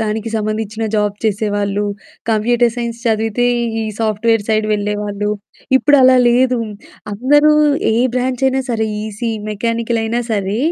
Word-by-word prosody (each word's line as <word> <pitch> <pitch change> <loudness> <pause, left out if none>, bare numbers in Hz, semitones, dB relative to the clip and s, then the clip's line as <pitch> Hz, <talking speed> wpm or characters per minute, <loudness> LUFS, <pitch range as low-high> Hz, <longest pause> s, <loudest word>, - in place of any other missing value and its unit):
దానికి 220 +1 -2
సంబంధించిన 215 +1 -3
జాబ్ 210 -1 +1
చేసేవాళ్ళు. 205 -1 0 0.5
కంప్యూటర్ 235 +2 +2
సైన్స్ 235 -1 -4
చదివితే, 225 +2 +1 0.4
ఈ - - -2 0.2
సాఫ్ట్‌వేర్ 220 0 +1
సైడ్ 215 -1 +1
వెళ్ళేవాళ్ళు. 205 0 -2 0.5
ఇప్పుడు 290 +2 +4
అలా 255 0 +6
లేదు. 250 +1 +3 0.5
అందరూ 290 +8 +4 0.4
ఏ - - +1 0.2
బ్రాంచయినా 260 +1 0
సరే, 220 -2 0 0.2
ఈసీ, 220 +2 -4 0.2
మెకానికలయినా 230 +1 -1
సరే, 200 +1 -1
225 Hz, 120 wpm, -17 LUFS, 210-240 Hz, 0.5 s, అలా